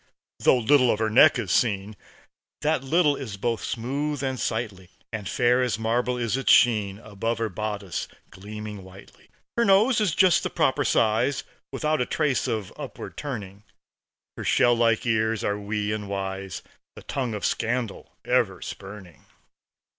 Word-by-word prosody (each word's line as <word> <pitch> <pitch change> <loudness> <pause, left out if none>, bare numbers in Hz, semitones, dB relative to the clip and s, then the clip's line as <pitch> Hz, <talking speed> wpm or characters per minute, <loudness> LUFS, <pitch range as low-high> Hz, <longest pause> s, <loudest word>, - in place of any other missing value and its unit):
Though - - +4
little 125 +2 +4
of 110 - +2
her 110 0 0
neck 145 +5 +6
is 105 -7 -3
seen, 105 -2 +1 0.7
That 150 -2 +1
little 150 +1 +3
is 110 -8 -6
both 115 +2 -2
smooth 140 +4 -3
and 130 -2 -2
sightly; 105 -5 -3 0.2
And 105 -3 -4
fair 125 0 +3
as 120 -5 0
marble 120 +3 0
is 120 -2 -1
its 135 - +2
sheen 105 -5 +4
Above 110 +1 -3
her 115 -1 -1
bodice 105 -1 -4 0.2
gleaming 105 +1 -8
whitely. 95 +1 -16 0.3
Her 235 - +4
nose 220 +3 +4
is 190 -7 +1
just 185 -3 +5
the - - -2
proper 145 -3 +1
size, 115 +3 +2 0.3
Without 150 +1 0
a 125 - 0
trace 150 -5 0
of 110 -4 -3
upward - - -8
turning. 105 -9 -6 0.7
Her - - -5
shell 120 - +4
like 115 -1 +2
ears 110 -1 +1
are 105 0 -1
wee 105 0 -2
and 105 -2 -4
wise, 95 -1 -4 0.3
The - - -11
tongue 125 -5 -3
of 105 - -3
scandal 115 -2 -2
ever - - +1
spurning. 95 -3 -10
115 Hz, 160 wpm, -25 LUFS, 105-130 Hz, 0.7 s, neck